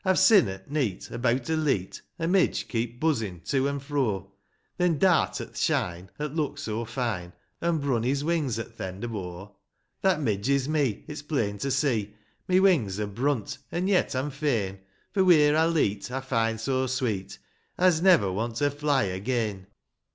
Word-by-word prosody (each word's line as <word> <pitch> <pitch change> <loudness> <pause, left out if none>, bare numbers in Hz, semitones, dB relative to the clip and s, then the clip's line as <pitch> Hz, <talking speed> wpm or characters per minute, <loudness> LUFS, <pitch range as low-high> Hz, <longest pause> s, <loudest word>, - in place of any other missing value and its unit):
I've 190 -2 +2
sin, 190 - +6
at 95 +6 -8
neet, 135 -11 -1
abeawt 120 +1 0
a - - +2
leet,' 140 - -1 0.2
A 165 - -2
midge 185 +1 +2
keep 120 0 -3
buzzin' 110 - -1
to 135 +9 0
an' 140 - -2
fro, 130 -9 -2 0.5
Then 175 -3 +2
dart 180 +1 +3
at - - -7
th' - - -11
shine, 90 +2 -1
'at 150 -1 -3
looked 155 -3 -2
so 110 +1 -3
fine, 110 -7 -3 0.3
And 170 -1 +1
brun 135 -5 0
his 135 +4 0
wings 150 -8 0
at 115 - -7
th' - - -5
end 95 +2 -5
of 115 -2 -4
o'; 95 +1 -7 0.2
' - - -49
That 190 -5 +3
midge 110 -4 -1
is 140 -1 +2
me, 145 -8 0
it's 150 -1 -6
plain 115 -9 -2
to 140 - -2
see, 120 -7 0 0.2
— - - -43
My 185 - +4
wings 150 - +3
are 105 - 0
brunt, 120 +4 -2
an' 180 +2 -1
yet, 190 -8 +2
I'm 135 +3 -1
fain; 115 -10 -1 0.3
For, 195 - +2
wheer 150 -5 +6
I 160 +1 +4
leet,^ 105 -11 0
I 130 +2 -2
find 115 -4 0
so 130 +3 0
sweet, 110 -7 -2 0.4
I's 180 -3 +4
never 170 - +5
want 115 +4 -2
to 145 +4 +1
fly 145 -1 +1
again 100 0 -2
130 Hz, 190 wpm, -27 LUFS, 105-150 Hz, 0.5 s, sin